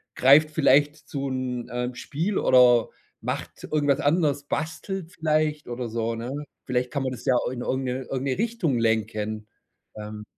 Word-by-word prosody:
greift 145 +4 +6
vielleicht 145 -1 +4
zu 140 -1 -3
'nem, 125 -2 -3
ähm, 125 0 -2
Spiel, 165 +10 -2
oder 125 -2 +5 0.3
macht - - -5
irgendwas 145 -2 +2
anderes, 145 -2 +2
bastelt 160 +4 -4
vielleicht 155 -2 0
oder 120 0 -4
so, 115 0 -2
ne? 115 +2 -5 0.3
Vielleicht 125 -1 -1
kann 140 -2 -1
man 130 - -1
das 120 -1 -10
ja 130 - +3 0.2
in 125 -1 -5
irgend 130 +2 -1
'ne 130 +1 -2
irgend 130 +1 -4
'ne 130 - 0
Richtung 215 - 0
lenken. 110 -1 -1 0.5
Ähm 105 0 -7
130 Hz, 160 wpm, -25 LUFS, 120-150 Hz, 0.5 s, greift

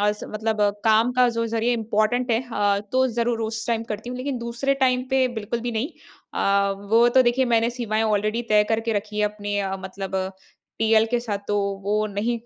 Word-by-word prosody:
अस 210 0 +1
मतलब, 220 +1 -2 0.3
काम 225 +3 +4
का 250 0 +4
जो 230 -1 -1
ज़रिए 230 +2 0
इंपॉर्टेंट 225 +2 0
है 225 0 +2
अ, 205 -1 +2
तो 260 0 +3
ज़रूर 235 -1 0
उस 220 -1 -5
टाइम 230 -1 0
करती 210 +3 -6
हूँ। 250 - -5
लेकिन 260 0 -3
दूसरे 235 +4 -1
टाइम 255 0 +2
पे 265 -1 +3
बिल्कुल 225 +2 -3
भी - - -2
नहीं। 225 +6 -1 0.5
अ, 200 0 +2 0.2
वो 235 +2 +6
तो - - +8
देखिए, 250 +2 +2
मैंने 230 -1 +2
सीमाएँ 225 -3 -1
ऑलरेडी 215 +2 0
तय 210 0 +6
करके 225 0 0
रखी 210 0 -3
हैं 210 - +3
अपने 205 -1 -4
अ, 195 -1 -2
मतलब 190 0 -7
अ, 190 0 -1 0.5
टीएल 220 0 +4
के 240 +1 0
साथ। 210 -4 -3
तो 205 - +1 0.3
वो 205 +1 0 0.2
नहीं 225 +4 -1
225 Hz, 205 wpm, -23 LUFS, 210-240 Hz, 0.5 s, तो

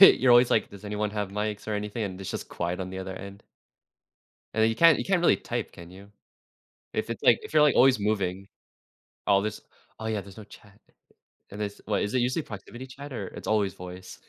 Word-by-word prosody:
you're 130 -9 +8
always, 120 0 +7
like, 110 - +2
"Does 100 0 -12
anyone 105 0 -2
have 105 -2 -2
mics 105 +1 -3
or 105 - 0
anything?" 105 +2 -3
and 95 -1 -5
it's 95 - -5
just - - -5
quiet 90 +2 -3
on 95 - -4
the 95 0 -6
other 95 0 -5
end. 100 +1 -10 1.1
And 110 - +2
then 110 - +5
you 115 - -3
can't 165 -1 +7
you - - -2
can't 190 -3 +2
really 175 - +5
type, 120 -2 -4
can 85 -1 -12
you? 100 +2 -13 0.8
If - - -2
it's, - - -5
like - - +6
if - - -9
you're, - - +7
like, 150 - +4
always 130 -3 +6
moving. 100 -2 -1 0.8
Oh, 100 -1 +5
this 105 0 -3 0.4
oh, 110 - -6
yeah, 110 -2 -1
there's 100 +2 -13
no 105 - -9
chat. 105 0 -17 0.7
And 105 +1 -6
it's 100 -1 -4
what, 105 -1 0
is 105 - -2
it 130 - +3
usually 130 +6 0
proximity 120 +5 -9
chat, 140 +2 -10
or 100 -5 -4
it's - - -9
always 105 -3 +2
voice. 90 0 -10
105 Hz, 225 wpm, -27 LUFS, 95-115 Hz, 1.1 s, you're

